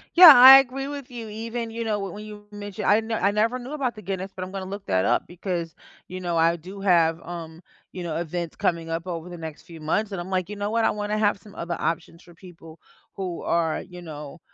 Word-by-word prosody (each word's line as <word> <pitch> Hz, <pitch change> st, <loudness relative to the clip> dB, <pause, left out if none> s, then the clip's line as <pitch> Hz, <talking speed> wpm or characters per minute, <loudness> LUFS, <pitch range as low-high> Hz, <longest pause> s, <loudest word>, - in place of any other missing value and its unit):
Yeah, 350 Hz, -2 st, +12 dB
I 265 Hz, +1 st, +11 dB
agree 270 Hz, +1 st, -2 dB
with 280 Hz, -3 st, -7 dB
you. 235 Hz, -2 st, -7 dB
Even, 230 Hz, +2 st, -5 dB
you 230 Hz, +1 st, -4 dB
know, 220 Hz, -2 st, 0 dB
w 195 Hz, -3 st, -5 dB
when 210 Hz, -, -8 dB
you 210 Hz, -1 st, -11 dB
mentioned 205 Hz, 0 st, -6 dB
I 210 Hz, +2 st, +5 dB
ne 225 Hz, 0 st, -3 dB
I 200 Hz, -1 st, +2 dB
never 225 Hz, +4 st, +1 dB
knew 255 Hz, +4 st, -8 dB
about 265 Hz, -5 st, -2 dB
the 215 Hz, -, -10 dB
Guinness, 190 Hz, 0 st, -4 dB
but 185 Hz, -, -5 dB
I'm 185 Hz, -, -10 dB
gonna 195 Hz, -1 st, -5 dB
look 200 Hz, +1 st, -7 dB
that 95 Hz, 0 st, +1 dB
up 120 Hz, +5 st, +2 dB
because, 175 Hz, -2 st, -4 dB, 0.3 s
you 185 Hz, +1 st, -7 dB
know, 175 Hz, -2 st, -1 dB
I 165 Hz, +1 st, +3 dB
do 185 Hz, +4 st, -10 dB
have, 170 Hz, -4 st, +3 dB
um, 165 Hz, -1 st, -8 dB, 0.3 s
you 185 Hz, -, -7 dB
know, 165 Hz, -2 st, -4 dB
events 170 Hz, 0 st, -4 dB
coming 165 Hz, -1 st, -1 dB
up 165 Hz, +2 st, -4 dB
over 170 Hz, -1 st, -5 dB
the 175 Hz, -, -8 dB
next 160 Hz, -2 st, -8 dB
few 165 Hz, -2 st, -12 dB
months 200 Hz, +7 st, -1 dB
and 185 Hz, -, -3 dB
I'm 175 Hz, -, -8 dB
like, 185 Hz, -2 st, -1 dB
"You 210 Hz, -, -6 dB
know 205 Hz, 0 st, -3 dB
what? 230 Hz, 0 st, +2 dB
I -, -, +3 dB
wanna 210 Hz, 0 st, -2 dB
have 205 Hz, -1 st, +2 dB
some 205 Hz, 0 st, -16 dB
other 170 Hz, -3 st, -4 dB
options 170 Hz, +1 st, -3 dB
for 175 Hz, -, -17 dB
people 165 Hz, -2 st, -14 dB, 0.4 s
who 185 Hz, -3 st, -4 dB
are, 165 Hz, -2 st, 0 dB
you 180 Hz, -1 st, -11 dB
know, 150 Hz, -1 st, -9 dB
190 Hz, 250 wpm, -24 LUFS, 170-215 Hz, 0.4 s, Yeah